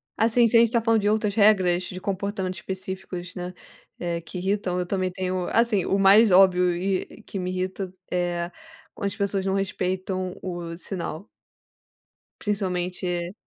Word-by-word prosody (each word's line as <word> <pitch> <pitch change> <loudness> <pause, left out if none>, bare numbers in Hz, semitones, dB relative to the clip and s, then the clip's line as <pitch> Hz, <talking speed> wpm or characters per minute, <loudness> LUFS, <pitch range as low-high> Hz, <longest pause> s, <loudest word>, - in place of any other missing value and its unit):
Assim, 230 +1 +4
se 230 - 0
a - - +8
gente 230 -1 +4
tá 235 -2 +2
falando 225 -1 +3
de 205 - +2
outras 210 -1 +1
regras 190 -4 +4
de 185 0 -7
comportamentos 190 -2 -3
específicos, 185 -1 -6
né, 180 0 -5 0.5
eh, 170 -1 -2
que 180 - -8
irritam, 190 -1 -1
eu 180 - -1
também 185 0 -1
tenho, 185 0 -2
assim, 230 -5 +3
o 195 - +1
mais 200 +2 +7
óbvio 180 -1 +5
e 190 +4 -2
que 200 - -7
me 180 0 -2
irrita 185 0 -3 0.2
é 175 -1 -1 0.4
quando 200 - -2
as 200 - -3
pessoas 200 -1 -1
não 195 - +1
respeitam 185 -1 -2
o 175 -2 -5
sinal. 175 0 -4 1.1
Principalmente 185 -3 -2
e 175 0 -2
185 Hz, 165 wpm, -25 LUFS, 180-200 Hz, 1.1 s, a